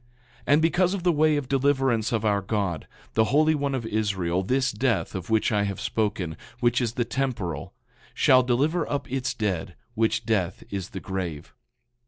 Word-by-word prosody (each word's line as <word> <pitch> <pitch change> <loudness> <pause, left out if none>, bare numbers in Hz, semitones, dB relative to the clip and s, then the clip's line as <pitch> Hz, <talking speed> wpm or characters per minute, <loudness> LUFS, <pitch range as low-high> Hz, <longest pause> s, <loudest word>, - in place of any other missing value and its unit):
9:11 - - -28
And 145 +2 +5
because 175 +3 +3
of 185 - -5
the 180 - +4
way 155 -1 +3
of 145 -3 -3
deliverance 135 -4 +1
of 115 -2 0
our 100 -1 +2
God, 95 -5 -2 0.3
the 110 - +3
Holy 155 +5 +3
One 140 -2 -1
of 120 -3 -3
Israel, 100 -5 0
this 130 +7 +1
death, 115 +2 0
of 95 -1 -6
which 110 +1 +2
I 105 -1 +2
have 100 -1 -4
spoken, 100 -7 -2 0.2
which 120 0 +2
is 120 -2 -1
the 120 -1 -1
temporal, 115 - -3 0.4
shall 130 -1 +5
deliver 145 +7 +1
up 140 -2 -3
its 130 -1 -1
dead; 95 -5 -2 0.2
which 110 -1 0
death 95 -5 -1
is 95 -2 -4
the - - -6
grave. 90 -6 -5
115 Hz, 185 wpm, -25 LUFS, 100-135 Hz, 0.4 s, And